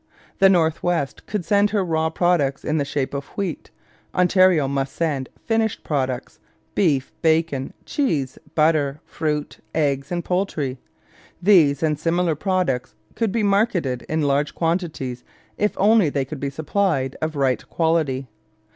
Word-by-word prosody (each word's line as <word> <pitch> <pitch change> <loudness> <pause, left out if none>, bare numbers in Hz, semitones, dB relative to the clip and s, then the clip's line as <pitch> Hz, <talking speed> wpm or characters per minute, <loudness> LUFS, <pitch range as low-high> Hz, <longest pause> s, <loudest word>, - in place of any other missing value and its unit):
The 195 -1 +7
North 165 -4 +2
West 170 -6 -2
could 205 -5 -3
send 205 0 +3
her 205 -2 0
raw 160 -1 +1
products 160 -5 +1
in 155 +1 +1
the 140 - 0
shape 140 -1 -2
of 140 0 -3
wheat; 195 -6 -3 0.5
Ontario 180 -4 +4
must 135 0 -2
send 145 -6 -1 0.2
finished 225 -1 0
products 130 -4 -2 0.3
beef, 145 -9 +1
bacon, 160 -4 +1
cheese, 150 - -1 0.2
butter, 150 -2 +2
fruit, 150 -2 -3 0.2
eggs, 140 -2 0
and 175 -1 -2
poultry 155 -8 -1 0.6
these 165 -7 +4
and 150 -2 +1
similar 170 +1 +1
products 175 -6 -1 0.2
could 225 -3 -1
be 225 +1 0
marketed 195 - +1
in 155 0 0
large 145 +1 +1
quantities 165 -8 -2 0.3
if 210 - 0
only 210 -4 +4
they 140 -2 -1
could 140 +2 -7
be 140 - -2
supplied 150 -2 0
of 155 0 -2
right 135 -3 0
quality. 155 -6 0
160 Hz, 145 wpm, -22 LUFS, 140-180 Hz, 0.6 s, The